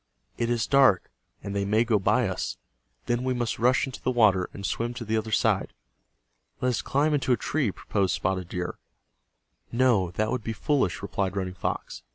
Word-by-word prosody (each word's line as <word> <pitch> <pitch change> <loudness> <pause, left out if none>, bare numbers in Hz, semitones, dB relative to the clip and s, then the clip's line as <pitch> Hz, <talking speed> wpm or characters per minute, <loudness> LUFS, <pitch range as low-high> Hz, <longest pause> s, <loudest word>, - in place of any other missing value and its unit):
"It 115 - -1
is 120 -2 +1
dark, 135 -10 +4 0.3
and 100 - -5
they 100 - +1
may 105 +3 +3
go 115 -3 +2
by 120 +4 +2
us. 95 - -3 0.5
Then 120 +1 0
we 130 0 0
must 120 -2 -2
rush 125 +2 +3
into 135 - -8
the - - 0
water, 105 -7 +3
and 100 - -7
swim 120 +3 -2
to 120 -2 -6
the 110 +1 0
other 110 0 -2
side." - - +1 0.9
"Let 125 - +1
us 120 - 0
climb 150 +3 +1
into 135 -3 +2
a - - +2
tree," 145 -7 0
proposed 95 0 -1
Spotted 95 -2 -2
Deer. 90 -1 -4 0.9
"No, 120 -7 +3
that 110 +5 -1
would 125 -3 -2
be 115 - -3
foolish," 130 - 0
replied 100 -1 -2
Running 95 -2 -2
Fox. 95 - -4
110 Hz, 195 wpm, -26 LUFS, 100-125 Hz, 0.9 s, dark